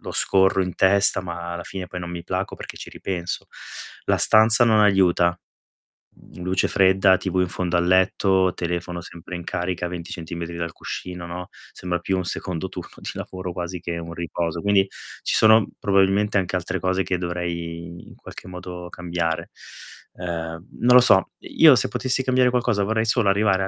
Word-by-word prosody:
lo - - -7
scorro 95 0 +3
in 90 -1 -4
testa 95 0 +3
ma 85 -1 -6
alla 85 0 -6
fine 95 -2 -6
poi 90 - -7
non 85 0 -6
mi 85 -1 -6
placo 95 +1 -3
perché - - -9
ci - - -9
ripenso. 90 -3 -4 0.6
La - - +1
stanza 110 +2 +5
non 110 -2 +4
aiuta, 95 -4 +4 0.9
mhmm, - - -15
luce 95 +1 +1
fredda, 95 0 +4
TV 95 -1 -3
in 90 - +1
fondo 90 -1 -1
al 85 - +1
letto, 95 0 +3
telefono 85 0 -4
sempre 85 +1 -9
in 85 - -6
carica 90 0 -3
20 85 -1 -7
centimetri 85 0 -6
dal 85 -1 -3
cuscino, 90 0 -7
no, 90 +1 -6 0.2
sembra 90 -1 -3
più 95 +2 -1
un 90 - -2
secondo 90 -1 -4
turno - - -9
di - - -6
lavoro 90 -1 -6
quasi 90 0 -5
che 85 0 -4
un 85 0 -7
riposo. 85 0 -3
Quindi, 100 -1 +3 0.3
ci - - -1
sono 110 -1 +6
probabilmente 100 +1 +2
anche 95 0 -2
altre 90 +1 -2
cose 95 +1 0
che 90 +1 -1
dovrei 85 -1 -5
in - - -14
qualche - - -11
modo 90 -1 -8
cambiare. 85 -2 -3 0.6
Uhm, 85 0 -5
non 125 +1 +5
lo - - +11
so, 95 -6 +4
io - - +6
se - - +1
potessi 130 0 -1
cambiare 130 -1 +3
qualcosa 120 -4 +1
vorrei 110 +2 0
solo 115 -2 +2
arrivare 100 -1 +2
a - - -1
90 Hz, 185 wpm, -23 LUFS, 85-95 Hz, 0.9 s, lo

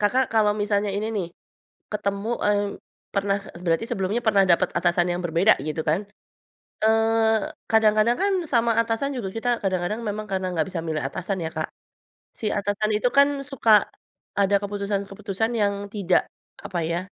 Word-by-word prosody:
Kakak 250 +6 +2
kalau 210 -2 +4
misalnya 205 -1 0
ini 205 +2 -2
nih, 180 -4 -1 0.7
ketemu, 200 +1 -2 0.2
eee, 205 0 +3 0.5
pernah 200 0 +1
eee, 195 -3 -12
berarti 165 +5 +1
sebelumnya 205 +2 -1
pernah 200 -2 +5
dapat 180 +1 +3
atasan 175 0 +2
yang 175 +1 -2
berbeda 175 +5 +4
gitu 155 +1 -3
kan? 180 +7 +1 0.8
Eee, 225 0 +3 0.2
kadang-kadang 220 +1 +4
kan 400 0 +2
sama 235 -4 +2
atasan 230 +4 0
juga 205 -6 -3
kita 225 +2 -2
kadang-kadang 190 +3 -1
memang 210 +1 -3
karena 190 -1 -1
nggak 160 -2 +1
bisa 170 - -3
milih 155 -2 -2
atasan 185 +6 -3
ya, 160 - -3
Kak. - - -3 0.7
Si 215 - -2
atasan 205 +1 -1
itu 245 +3 +2
kan 280 0 +6 0.2
suka 230 -7 +4 0.5
ada 200 0 +3
keputusan-keputusan 200 +1 -2
yang 200 -2 +2
tidak 195 -3 +1 0.3
apa 180 - -5
ya, 170 +1 -1
205 Hz, 160 wpm, -24 LUFS, 185-220 Hz, 0.8 s, kan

